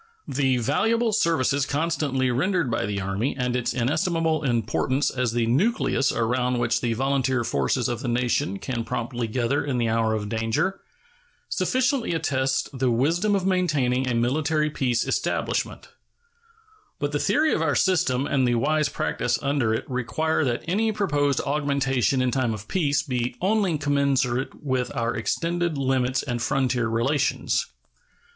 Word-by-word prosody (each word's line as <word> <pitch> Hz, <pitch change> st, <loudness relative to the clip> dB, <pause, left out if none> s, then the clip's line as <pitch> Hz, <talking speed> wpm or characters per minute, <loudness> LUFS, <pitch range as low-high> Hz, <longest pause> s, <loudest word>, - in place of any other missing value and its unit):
The 130 Hz, -1 st, +1 dB
valuable 225 Hz, -, +1 dB
services 145 Hz, -, +1 dB
constantly 145 Hz, -4 st, 0 dB
rendered 165 Hz, +1 st, 0 dB
by 105 Hz, -, -1 dB
the 100 Hz, -1 st, -2 dB
Army 100 Hz, +7 st, -2 dB
and 125 Hz, -1 st, -1 dB
its 125 Hz, -1 st, 0 dB
inestimable 160 Hz, +5 st, 0 dB
importance 125 Hz, +2 st, 0 dB
as 125 Hz, -3 st, -1 dB
the 120 Hz, -1 st, +1 dB
nucleus 145 Hz, -, +1 dB
around 125 Hz, +2 st, 0 dB
which 120 Hz, 0 st, 0 dB
the 120 Hz, -2 st, 0 dB
volunteer 130 Hz, 0 st, 0 dB
forces 120 Hz, +1 st, 0 dB
of 120 Hz, -, -2 dB
the -, -, -4 dB
nation 120 Hz, -5 st, 0 dB
can 115 Hz, +3 st, -3 dB
promptly 120 Hz, +1 st, -3 dB
gather 120 Hz, +4 st, 0 dB
in 135 Hz, -3 st, -2 dB
the 115 Hz, -2 st, +1 dB
hour 110 Hz, -1 st, +1 dB
of 105 Hz, -1 st, -3 dB
danger, 115 Hz, -, -1 dB, 0.7 s
sufficiently 255 Hz, -, 0 dB
attest 135 Hz, -4 st, 0 dB
the 130 Hz, 0 st, +1 dB
wisdom 165 Hz, -, +2 dB
of 190 Hz, -2 st, -1 dB
maintaining 145 Hz, -9 st, +1 dB
a 125 Hz, -, 0 dB
military 150 Hz, +6 st, +1 dB
peace 125 Hz, -4 st, 0 dB
establishment; -, -, -2 dB, 1.1 s
but 145 Hz, 0 st, -2 dB
the 145 Hz, -, -1 dB
theory 300 Hz, -, +2 dB
of -, -, 0 dB
our 150 Hz, -3 st, +1 dB
system 140 Hz, -9 st, +2 dB
and 130 Hz, -3 st, +1 dB
the 120 Hz, -, +2 dB
wise 150 Hz, +4 st, +1 dB
practice 120 Hz, -3 st, -1 dB
under 140 Hz, -5 st, +1 dB
it 110 Hz, -, -2 dB
require 130 Hz, +6 st, -1 dB
that 120 Hz, -4 st, -1 dB
any 215 Hz, +6 st, +1 dB
proposed 145 Hz, -9 st, 0 dB
augmentation 140 Hz, -3 st, +1 dB
in 125 Hz, -, +1 dB
time 120 Hz, -3 st, 0 dB
of 105 Hz, 0 st, -10 dB
peace 145 Hz, -6 st, +1 dB
be 125 Hz, -4 st, -2 dB
only 195 Hz, -3 st, +1 dB
commensurate 140 Hz, -3 st, 0 dB
with 130 Hz, -3 st, -1 dB
our 115 Hz, 0 st, 0 dB
extended 170 Hz, +6 st, -1 dB
limits 130 Hz, -1 st, 0 dB
and 120 Hz, -3 st, -3 dB
frontier 125 Hz, -1 st, 0 dB
relations. 125 Hz, +6 st, 0 dB
135 Hz, 150 wpm, -24 LUFS, 120-155 Hz, 1.1 s, wisdom